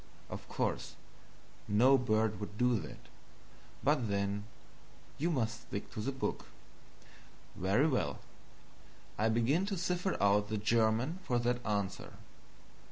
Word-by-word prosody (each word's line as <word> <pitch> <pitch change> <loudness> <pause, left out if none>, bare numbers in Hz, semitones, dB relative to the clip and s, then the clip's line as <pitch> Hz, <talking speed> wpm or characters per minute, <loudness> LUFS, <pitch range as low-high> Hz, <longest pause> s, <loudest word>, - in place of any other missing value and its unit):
Of - - -7
course - - -2 0.7
no 120 +7 +6
bird 110 -4 +1
would 105 0 -6
do 125 -2 +3
that, 75 - -8 0.9
but 140 -4 +2
then 100 +1 -1 0.7
you 165 +4 +1
must 120 -6 -1
stick 100 -5 -6
to - - -6
the 135 - -1
book. 135 - -3 1.1
Very 100 - +3
well, 75 - 0 1.0
I 110 +1 +3
begin 125 - +2
to 200 -2 -2
cipher 180 +2 -1
out 100 +1 +3
the 110 - -1
German 115 - +2
for 125 -9 0
that 120 +1 0
answer. 100 -3 -2
115 Hz, 125 wpm, -33 LUFS, 105-135 Hz, 1.1 s, no